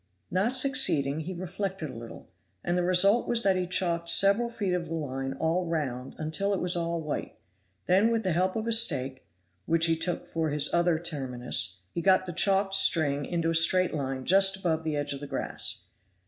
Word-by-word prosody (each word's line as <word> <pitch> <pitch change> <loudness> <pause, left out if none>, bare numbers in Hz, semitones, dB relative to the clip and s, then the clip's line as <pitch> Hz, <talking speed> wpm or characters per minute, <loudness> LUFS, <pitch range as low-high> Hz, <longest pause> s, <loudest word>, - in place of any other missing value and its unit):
Not 205 +9 0
succeeding, 205 - +1
he 170 +4 -5
reflected 185 -3 -5
a - - -11
little, 115 0 -10 0.4
and 175 - -1
the 180 - +1
result 185 +6 +3
was 235 -1 +1
that 195 -1 +3
he 180 -1 -2
chalked 170 -2 0
several 200 +7 +4
feet 205 -6 -3
of 175 -2 -2
the 165 - -4
line 135 -3 -4
all 165 +5 -1
round 135 -6 -4
until 160 +6 -2
it - - -3
was 180 0 +1
all 170 0 -2
white; 155 -2 -5 0.5
then 195 +5 +3
with 230 -1 -1
the 185 - 0
help 185 +3 0
of 220 0 -3
a 230 - -1
stake, 135 - +1 0.4
which 165 0 +3
he 165 -1 +2
took 170 +1 -2
for 160 -1 -2
his 150 0 0
other 170 -1 +2
terminus, 125 - -3
he 170 - -4
got 185 +1 +3
the 175 - -6
chalked 195 +2 +1
string 145 -7 +3
into 165 0 -1
a - - -1
straight 180 +2 +3
line 135 -3 -4
just 195 +1 +5
above 165 -4 -1
the 155 -2 -2
edge 145 0 -2
of 140 - -7
the 145 - -8
grass. - - -5
170 Hz, 205 wpm, -27 LUFS, 150-190 Hz, 0.5 s, just